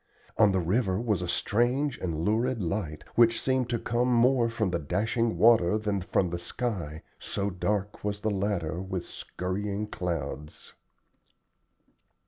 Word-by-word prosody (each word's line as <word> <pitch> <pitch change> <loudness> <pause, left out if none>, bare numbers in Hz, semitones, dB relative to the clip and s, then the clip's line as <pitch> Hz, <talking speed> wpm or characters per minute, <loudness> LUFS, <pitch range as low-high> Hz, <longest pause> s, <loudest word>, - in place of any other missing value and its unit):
On 105 -3 +5
the 95 - +1
river 95 +2 +1
was 110 -6 0
a 90 - -3
strange 120 +10 +1
and 85 -2 -2
lurid 115 +4 +1
light, 85 -4 -3
which 115 -1 +4
seemed 130 -2 0
to 120 - +1
come 120 +2 0
more 120 0 +4
from 110 -5 -1
the 85 - 0
dashing 110 - 0
water 110 -4 +5
than 105 -2 -1
from 90 0 0
the 85 - -3
sky, 85 - -4 0.2
so 100 +1 -2
dark 100 +2 -2
was 105 0 -2
the 110 - 0
latter 95 -4 -1
with 95 -2 -4
skurrying 100 +3 -4
clouds. 75 -7 -5
100 Hz, 145 wpm, -28 LUFS, 90-115 Hz, 0.2 s, On